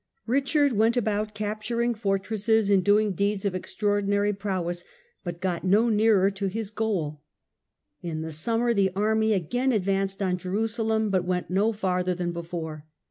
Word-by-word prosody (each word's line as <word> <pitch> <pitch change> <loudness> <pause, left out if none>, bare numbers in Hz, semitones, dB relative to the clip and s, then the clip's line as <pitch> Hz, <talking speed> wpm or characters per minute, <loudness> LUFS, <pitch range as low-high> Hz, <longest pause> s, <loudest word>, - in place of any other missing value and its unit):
Richard 275 +3 +2
went 225 +3 +2
about 215 -2 -1
capturing 220 +3 -1
fortresses 210 0 0
and 195 -2 +4
doing 205 +1 +3
deeds 200 +1 -1
of 200 - 0
extraordinary 205 +2 0
prowess, 185 -3 -3 0.4
but 175 -3 -5
got 180 -2 -2
no 210 +5 +3
nearer 210 -3 +4
to 195 0 -3
his 210 +1 -4
goal. 185 -10 -2 0.8
In 160 -2 -4
the 160 - -5
summer 230 +9 0
the 200 -3 +3
army 220 +2 +2
again 245 - 0
advanced 195 -2 0
on 185 -2 0
Jerusalem, 220 +3 0
but 185 -2 +1
went 180 0 -2
no 200 +4 +2
farther 185 -3 -1
than 175 -1 -2
before. 165 -3 -6
205 Hz, 150 wpm, -26 LUFS, 185-220 Hz, 0.8 s, and